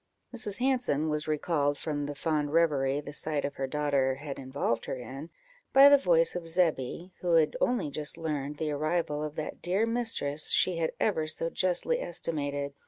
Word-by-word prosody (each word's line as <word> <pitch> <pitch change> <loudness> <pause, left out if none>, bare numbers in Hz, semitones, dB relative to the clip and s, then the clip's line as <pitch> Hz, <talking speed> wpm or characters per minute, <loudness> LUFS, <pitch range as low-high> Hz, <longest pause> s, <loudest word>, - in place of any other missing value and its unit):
Mrs. 210 -4 0
Hanson 245 - +1
was 150 0 -2
recalled 150 -2 0
from 145 -2 -3
the 145 - -5
fond 150 -1 -1
reverie 145 -4 +2
the 145 0 -9
sight 150 -1 -1
of 140 - -3
her 135 - -2
daughter 140 -2 +1
had 140 0 -7
involved 130 -3 -2
her - - -3
in, 130 +5 -8 0.4
by 275 +1 +9
the 285 - +8
voice 170 -9 +3
of 175 -2 -4
Zebby, 165 0 0
who 175 -2 +1
had 155 -2 +3
only 240 -12 +1
just 150 +1 -2
learned 150 -3 -3
the 155 -1 -2
arrival 155 0 -1
of 150 0 -5
that 155 - -5
dear 190 +5 +1
mistress 225 -11 -1
she 185 -2 +3
had 165 -1 -1
ever 160 -7 +1
so 165 +1 -2
justly 190 - 0
estimated. 145 - -3
155 Hz, 180 wpm, -29 LUFS, 145-175 Hz, 0.4 s, by